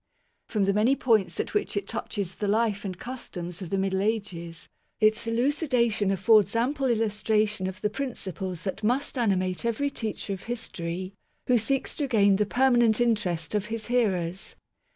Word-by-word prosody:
From 210 -3 0
the 195 0 +2
many 220 +7 +3
points 225 -7 +2
at - - -2
which 415 - 0
it 200 0 -2
touches 195 -3 -3
the 205 - -2
life 210 -1 +1
and 185 -3 -4
customs 180 -8 -7
of 180 - -5
the 195 - 0
Middle 190 0 0
Ages, 190 -6 -3 0.3
its 215 +1 +3
elucidation 235 - +1
af 195 -1 0
fords 210 0 +4
ample 265 +4 +1
illustration 215 -3 +1
of 190 +1 -6
the 210 - +1
principles 190 -9 -4
that 190 +1 -4
must 255 +8 0
animate 185 -6 0
every 235 +5 0
teacher 215 -4 -3
of 190 - -8
history, 185 -6 -4 0.3
who 245 -2 +4
seeks 270 +5 -1
to 290 - 0
gain 205 -5 +4
the 210 0 +1
permanent 240 -2 +3
interest 205 -9 0
of 210 -1 0
his 225 0 -4
hearers. 190 -6 0
210 Hz, 170 wpm, -27 LUFS, 190-235 Hz, 0.3 s, fords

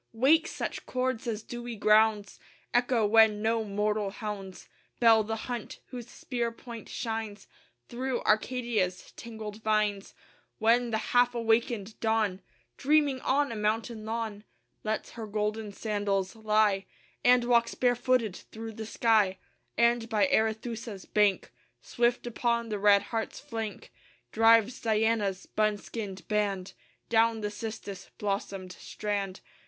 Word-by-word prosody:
Wake 290 +8 +4
such - - -5
chords 255 -1 -1
as 220 -2 -3
dewy 240 0 -6
grounds 215 -1 +3 0.3
Echo 245 -2 +3
when 220 0 +5
no 225 0 +1
mortal 210 0 -1
hounds 195 -2 -7 0.3
Bell 225 -2 +6
the 220 +1 -3
hunt, 240 -3 -5
whose 245 -2 -7
spear 240 -3 -3
point 230 -1 -10
shines 220 -3 -4 0.4
Through 255 +1 -3
Arcadia's 215 -5 0
tangled 220 -2 -8
vines, 210 -2 0 0.4
When 235 +2 +3
the 220 - 0 0.2
half 245 0 +4
awakened 225 -2 0
Dawn, 220 -4 +1 0.4
Dreaming 285 -2 +3
on 280 0 +1
a - - -4
mountain 215 +1 -1
lawn, 220 -2 -4 0.4
Lets 220 0 -2
her 225 -2 -7
golden 210 0 -2
sandals 200 -2 -1
lie 215 -3 +2 0.4
And 245 0 +5
walks 235 -1 +2
barefooted 245 -4 +1
through 225 0 -9
the 220 0 -7
sky; 215 -5 +2 0.4
And 235 -1 +3
by 220 +1 +3
Arethusa's 220 -2 -1
bank, 205 -2 +2 0.3
Swift 240 0 0
upon 235 0 -1
the 210 -1 -2
red 200 0 +5
hart's 225 -1 -4
flank, 225 -2 -6 0.4
Drives 225 +2 +4
Diana's 220 -3 +1
buskined 210 -2 -2
band 200 -3 -1 0.4
Down 225 -1 +3
the 210 0 -2
cistus 205 -2 -7
blossomed 195 -2 -3
strand. 200 0 -4
220 Hz, 125 wpm, -29 LUFS, 210-235 Hz, 0.4 s, Bell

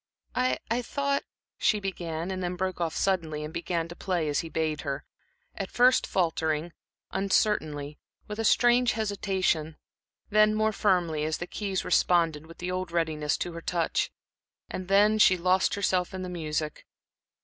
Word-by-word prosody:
"I 255 0 +1
I 240 +2 +2
thought," 280 +3 -1 0.4
she 210 - +3
began, 175 -3 -4
and 185 0 -3
then 180 0 -2
broke 185 0 -2
off 165 -2 -1
suddenly, 160 -6 0
and 155 +1 -6
began 170 -1 -2
to 170 - -9
play 175 -5 -1
as 145 - +1
he 165 - -4
bade 160 -1 -1
her 140 -1 -4 0.5
at 195 - -5
first 250 +1 +4
faltering, 160 -2 0 0.4
uncertainly, 155 -7 0 0.3
with 210 +1 -6
a - - 0
strange 240 +2 +4
hesitation; 190 -7 -1 0.5
then 215 +1 +5
more 215 0 +2
firmly, 175 -7 +1
as 155 0 -1
the 175 - -4
keys 195 0 -3
responded 165 -4 +2
with 165 - -13
the 180 +1 -4
old 185 -1 -3
readiness 155 -3 0
to 175 - -3
her 165 - -7
touch, 170 -1 0 0.6
and 205 +3 +3
she 185 - +6
lost 185 +2 +2
herself 185 -2 0
in 185 - -4
the 185 - -5
music. 155 -3 -3
180 Hz, 160 wpm, -28 LUFS, 160-200 Hz, 0.6 s, she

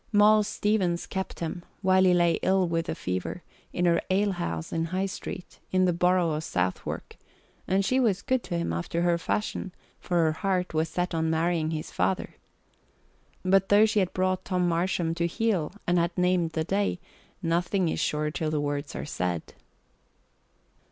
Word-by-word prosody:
Moll 210 0 +6
Stevens 205 -4 0
kept 190 -2 -5
him, 170 +1 -4 0.2
while 185 0 +5
he 185 - +5
lay 170 -1 +3
ill 190 -1 +2
with 165 0 -1
the - - -2
fever, 90 - -4 0.3
in 180 - 0
her 170 -1 +3
alehouse 185 - -1
in 165 0 0
High 185 +3 -1
Street, 185 -1 -7
in 185 0 +3
the 180 - +2
borough 180 -1 +2
of 155 +1 -2
Southwark, 90 - -3 0.5
and 190 +1 +2
she 255 +6 +2
was 210 -7 +1
good 260 -1 +1
to 170 - -2
him 170 - -1
after 85 - -2
her 170 -1 +2
fashion, 195 +1 -2 0.3
for 180 - -3
her 160 - +3
heart 185 +1 -1
was 160 +1 +1
set 180 0 -2
on 160 0 0
marrying 160 0 +1
his 155 -1 -4
father. 90 +1 -1 1.1
But 195 +1 +3
though 205 +2 +7
she 215 -1 +2
had 185 -2 +1
brought 185 0 0
Tom 180 -2 0
Marsham 170 -1 0
to 170 0 0
heel 190 -3 0
and 175 0 +2
had 170 +1 -1
named 180 -2 +2
the 160 - 0
day, 195 +1 0 0.4
nothing 175 +2 +1
is - - -1
sure 150 0 0
till 155 0 -2
the 155 -1 0
words 145 0 -3
are - - -4
said. 90 - -3
175 Hz, 180 wpm, -27 LUFS, 160-190 Hz, 1.1 s, though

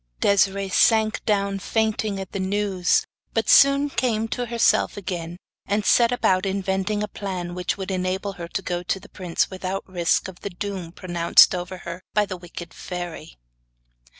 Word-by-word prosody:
Desiree 200 0 +2
sank 220 +3 +3
down 200 -2 +1
fainting 215 -1 -1
at 190 -1 -7
the 195 - -4
news, 190 -1 +1 0.3
but - - +1
soon 280 +1 +6
came 230 -5 0
to 245 +1 -3
herself 235 -2 +2
again, 175 -3 -5 0.3
and 205 +1 0
set 235 -1 +5
about 190 -6 +2
inventing 195 +1 -1
a - - -2
plan 185 -4 -5
which 180 +2 -2
would 195 0 -4
enable 185 +2 -2
her 175 -2 -7
to 190 - -4
go 175 -1 -2
to 180 +2 -2
the 200 - -15
prince 180 -2 -1
without 190 +1 -4
risking 180 0 0
the - - -4
doom 185 -2 -5
pronounced 175 -1 +4
over 180 +1 -4
her 170 +1 -6
by 210 -1 +4
the 185 -2 -5
wicked 175 -1 -9
fairy. 175 -3 -7
190 Hz, 165 wpm, -23 LUFS, 180-205 Hz, 0.3 s, soon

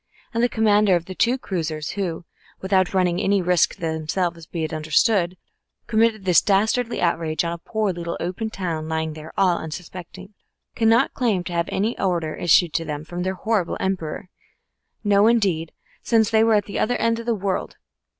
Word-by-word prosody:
And 230 - 0
the 245 - +3
commander 210 -4 +3
of 170 -1 -2
the 185 - -7
two 240 +7 +2
cruisers, 160 - -3
who, 180 -4 -4 0.3
without 190 -1 +1
running 180 -1 +1
any 200 -1 +2
risk 180 -1 +2
to - - -27
themselves, 165 +1 -2
be 165 -2 -4
it 155 - -3
understood, 170 - +1 0.5
committed 220 -2 +1
this 180 -3 +5
dastardly 220 +4 +1
outrage 165 -2 0
on 170 - -2
a 170 - -7
poor 215 +2 -1
little 170 -1 -5
open 185 +6 -3
town 165 -6 -4
lying 160 -1 -2
there 155 +1 -10
all 180 -3 +3
unsuspecting, 180 +4 -9 0.4
cannot 230 +3 +3
claim 220 -8 0
to 175 - -6
have 170 0 0
had - - -4
any 210 +5 -1
order 170 -5 0
issued 175 -1 +3
to 165 - 0
them 150 -1 -5
from 175 +2 -5
their 190 +1 -2
horrible 210 -3 -1
Emperor 180 -1 -3 0.7
no, 205 0 +4
indeed, 190 -9 +1 0.3
since 225 -2 +2
they 220 0 +4
were 225 -1 +4
at 205 - +2
the 200 - -4
other 245 - +1
end 230 0 +1
of 230 - -8
the 235 - +2
world. 195 -1 -3
185 Hz, 190 wpm, -22 LUFS, 170-215 Hz, 0.7 s, this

